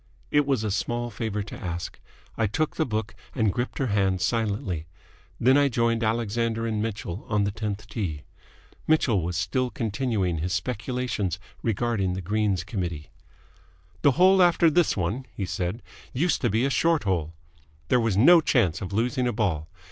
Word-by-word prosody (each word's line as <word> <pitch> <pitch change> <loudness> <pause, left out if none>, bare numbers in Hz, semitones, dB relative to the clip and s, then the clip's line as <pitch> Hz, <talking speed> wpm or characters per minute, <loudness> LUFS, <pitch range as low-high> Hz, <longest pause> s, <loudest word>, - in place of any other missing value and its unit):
It 145 -1 +3
was 135 -6 +1
a 105 - -1
small 120 +4 -2
favour 105 -1 -3
to 105 - -9
ask. 85 -1 -5 0.4
I 110 - +1
took 155 +9 -1
the 160 - 0
book 110 -2 -2 0.2
and 110 -7 +2
gripped 120 +1 -3
her 135 - 0
hand 95 -2 +2
silently. 100 -5 -1 0.5
Then 130 +4 +5
I 145 - +4
joined 115 -1 +1
Alexander 115 +1 0
and 110 -2 -1
Mitchell 105 -4 -4
on 105 -1 +2
the 100 - 0
tenth 105 0 -4
tee. 90 -9 -4 0.6
Mitchell 130 - +3
was 85 +1 -3
still 125 +8 0
continuing 110 - -1
his 90 +4 -2
speculations 110 - -2 0.2
regarding 110 -4 0
the 95 - -4
Greens 100 -1 0
Committee. 90 -6 -4 0.9
"The 140 - +5
hole 185 +5 +5
after 170 -2 +5
this 175 -5 +2
one," 105 +9 -2
he 100 - -2
said, 90 +5 -3 0.3
"used 155 +5 +1
to 120 - +2
be 110 +5 +1
a 140 - 0
short 165 +1 +2
hole. 85 -5 -1 0.5
There 125 - +4
was 115 -5 +1
no 165 +10 +7
chance 95 - +2
of 95 - -5
losing 125 +5 0
a - - +1
ball. 90 -9 -1
110 Hz, 170 wpm, -26 LUFS, 95-125 Hz, 0.9 s, no